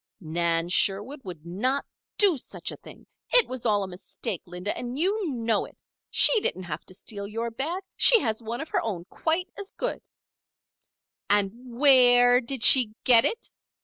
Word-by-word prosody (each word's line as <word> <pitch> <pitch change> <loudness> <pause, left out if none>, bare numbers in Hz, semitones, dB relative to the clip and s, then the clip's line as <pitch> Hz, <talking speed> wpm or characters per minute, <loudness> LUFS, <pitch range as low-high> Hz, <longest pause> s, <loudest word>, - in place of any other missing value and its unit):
"Nan 165 -1 -1
Sherwood 205 +10 +1
would 175 -5 -10
not 250 +11 -2 0.3
do 400 -5 +4
such 260 - -6
a - - -10
thing. - - -16 0.2
It - - +5
was 255 -2 -4
all 205 -2 +1
a - - -6
mistake, 185 +2 -6
Linda, 180 +3 -5
and 245 +1 -6
you 385 +3 -1
know 230 -5 -1
it. - - -17 0.3
She 450 - +5
didn't 185 - -2
have 160 -2 -7
to 185 - -10
steal 200 0 -5
your 230 +3 -5
bag! 320 +11 -4
She 480 -2 +6
has 220 - -3
one 230 +1 -6
of 315 - -8
her - - -1
own 185 -6 -5
quite 345 +3 -2
as 400 -1 -6
good - - -4 0.7
" - - -54
"And 205 -1 +2 0.3
where 245 -3 +5
did 245 -1 -5
she 235 -5 +6
get 235 -2 +5
it?" 460 - -3
235 Hz, 180 wpm, -25 LUFS, 195-275 Hz, 0.7 s, She